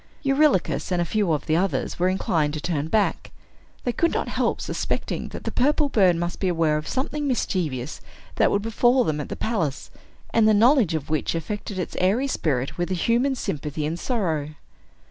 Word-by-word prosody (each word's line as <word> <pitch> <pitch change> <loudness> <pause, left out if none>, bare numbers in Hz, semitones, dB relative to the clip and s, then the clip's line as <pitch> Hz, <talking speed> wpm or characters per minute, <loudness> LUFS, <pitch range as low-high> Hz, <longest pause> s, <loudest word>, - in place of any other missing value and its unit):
Eurylochus 275 - +2
and 180 - +1
a 175 - +1
few 205 -1 0
of 150 - -1
the 155 - +1
others 185 +1 -1
were 180 +1 +3
inclined 160 -5 0
to - - -3
turn 150 -2 -2
back. 210 +4 0 0.5
They 245 - 0
could 335 +7 +1
not - - -2
help - - 0
suspecting - - -3
that - - -8
the - - -3
purple 290 +3 +2
bird 190 -8 +4
must 175 +1 -3
be 190 - 0
aware 165 -3 +2
of 155 - -5
something 290 +2 -2
mischievous 155 - -2 0.4
that - - +4
would 200 - 0
befall 240 +3 +3
them 150 -5 -1
at - - -7
the - - -4
palace, 170 - -2 0.4
and 225 -1 +4
the 215 - +5
knowledge 230 - +4
of 155 -1 -4
which 155 +1 0
affected 205 +4 -4
its 180 - -4
airy 210 +9 +2
spirit 140 - -1
with 175 - -1
a 185 - 0
human 240 +9 +1
sympathy 150 - -3
and 165 +3 -3
sorrow. 160 - -2
185 Hz, 195 wpm, -24 LUFS, 155-235 Hz, 0.5 s, the